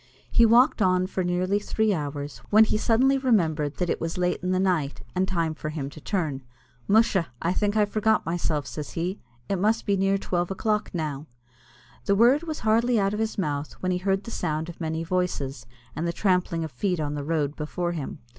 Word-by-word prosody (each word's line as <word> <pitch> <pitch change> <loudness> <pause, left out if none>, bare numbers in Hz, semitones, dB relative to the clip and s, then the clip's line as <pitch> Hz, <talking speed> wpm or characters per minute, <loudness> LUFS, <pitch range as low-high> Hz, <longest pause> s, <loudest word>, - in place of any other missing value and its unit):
He 235 -1 +6
walked 240 +2 +5
on 185 -1 +3
for 185 0 -2
nearly 180 +3 +1
three 215 0 0
hours, 145 -5 -4
when 215 +1 +7
he 220 - 0
suddenly 255 +5 +3
remembered 160 - +1
that 180 - -1
it - - -1
was 165 +1 -3
late 180 0 0
in 180 - -2
the 185 0 +1
night, 160 - 0
and 185 +1 +1
time 170 -4 0
for 155 0 -5
him 145 -3 -4
to 155 - -12
turn. 155 -9 -2 0.5
"Musha! 205 -4 +3
I 170 +2 0
think 205 +2 0
I 210 - +5
forgot 215 +1 +1
myself," 165 -3 -1
says 150 -2 -6
he; 180 +4 -2 0.3
"it 195 - 0
must 215 +4 +1
be 200 - +2
near 195 +1 +2
twelve 175 -2 -1
o'clock 210 +2 -1
now." 155 -3 -4 0.8
The 200 - +3
word 245 +7 +5
was 320 -2 -5
hardly 230 +2 +3
out 195 0 +1
of 210 - -3
his 220 0 -2
mouth, 150 -5 -2
when 185 - -3
he 180 - 0
heard 195 +1 0
the 230 - -8
sound 155 -2 -2
of 175 - -10
many 160 0 -2
voices, 145 -8 -2 0.3
and 170 - -2
the 170 - -1
trampling 180 -3 +1
of 160 - -5
feet 180 +7 -1
on 150 -1 -2
the 145 -1 -4
road 150 -1 -1
before 175 +3 -3
him. 155 -6 -5
180 Hz, 210 wpm, -26 LUFS, 155-210 Hz, 0.8 s, when